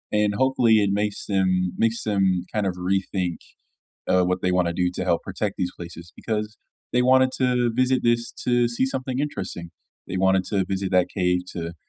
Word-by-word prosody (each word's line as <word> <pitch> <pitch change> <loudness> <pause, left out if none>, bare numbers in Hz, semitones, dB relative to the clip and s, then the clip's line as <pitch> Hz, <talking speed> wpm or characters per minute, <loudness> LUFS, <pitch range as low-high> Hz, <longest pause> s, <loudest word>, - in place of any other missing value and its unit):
and, 105 -1 +2
hopefully, 125 -3 +3
it 100 - +1
makes 105 0 -2
them 95 -2 +1
makes 115 0 +1
them 95 -4 +1
kind 105 -2 0
of 90 - -2
rethink, 90 -1 -1 0.7
uh, 90 -1 +4
what 90 0 0
they 90 - +1
wanna 90 -2 +1
do 90 0 0
to 90 - -4
help 85 -2 +1
protect 100 +1 -3
these 90 -1 -1
places, 85 -1 -10
because 105 -1 -3 0.4
they 125 - +4
wanted 130 +1 +5
to 125 -2 +1
visit 130 +1 +2
this 120 0 +1
to 120 -1 +1
see 120 +2 0
something 130 -1 -3
interesting, 95 - -4 0.4
they 95 - -3
wanted 95 0 +3
to 100 -1 0
visit 95 0 -3
that 90 -1 +3
cave 90 -1 +1
to 85 -1 -5
95 Hz, 185 wpm, -24 LUFS, 90-120 Hz, 0.7 s, wanted